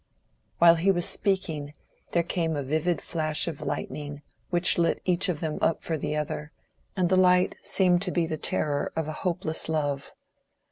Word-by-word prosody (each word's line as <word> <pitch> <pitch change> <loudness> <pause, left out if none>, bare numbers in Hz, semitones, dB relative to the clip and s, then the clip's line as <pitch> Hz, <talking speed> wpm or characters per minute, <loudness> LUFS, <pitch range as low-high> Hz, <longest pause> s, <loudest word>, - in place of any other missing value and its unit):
While 170 0 +6
he 180 +4 +1
was 175 -2 +3
speaking 160 -8 -1 0.4
there 170 - +2
came 165 -2 -1
a 145 - -2
vivid 155 +4 -1
flash 155 -1 +1
of 160 -4 -5
lightning 145 -1 -5 0.3
which 175 0 +2
lit 170 -1 +1
each 185 +1 +2
of 160 -4 -2
them 155 -2 -3
up 165 - 0
for 165 - -2
the 150 0 -3
other—and 150 +4 -5
the 185 +2 +2
light 180 0 +4
seemed 180 -2 +3
to 190 -2 0
be 175 -2 0
the 160 - -3
terror 145 -1 -1
of 160 -2 -2
a 155 - -4
hopeless 170 -4 0
love. 145 -3 -2
165 Hz, 175 wpm, -26 LUFS, 150-180 Hz, 0.4 s, While